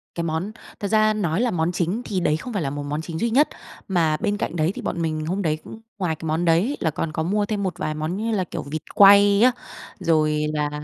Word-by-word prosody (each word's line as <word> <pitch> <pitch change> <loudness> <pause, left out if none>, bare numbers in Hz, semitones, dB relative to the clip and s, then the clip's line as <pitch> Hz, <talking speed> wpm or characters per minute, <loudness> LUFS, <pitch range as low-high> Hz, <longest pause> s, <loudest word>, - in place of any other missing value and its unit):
Cái 170 - -2
món 165 +5 -2 0.3
thật 200 - -2
ra 215 +1 +3
nói 185 -3 0
là 245 -1 +1
món 165 -1 0
chính 180 +5 -1
thì 195 - -1
đấy 155 -3 +1
không 245 +8 -7
phải 200 - -1
là 140 - -1
một 145 +1 -5
món 150 +2 -3
chính 160 0 -6
duy 235 - +1
nhất, 275 +7 +4 0.4
mà 165 -5 +1
bên 205 +4 -1
cạnh - - -3
đấy 160 +1 +1
thì - - -6
bọn 170 - -3
mình 155 -1 -2
hôm 185 +5 -2
đấy 155 -4 0
cũng 225 - -11 0.2
ngoài 175 -5 -1
cái 160 - -9
món 160 +3 0
đấy 165 0 +4
ấy 265 +10 -2
là 160 - 0
còn 155 +1 -3
có 160 - -2
mua 205 +4 0
thêm 205 -1 -2
một 185 -2 -3
vài 155 - -2
món 155 +4 -3
như 225 +2 -2
là, 200 -4 +1
kiểu, 175 - -6
vịt 150 +2 -5
quay 200 0 +7
á, 250 +2 +6 0.5
rồi 155 -2 +2
là 150 -1 0
175 Hz, 270 wpm, -23 LUFS, 155-205 Hz, 0.5 s, quay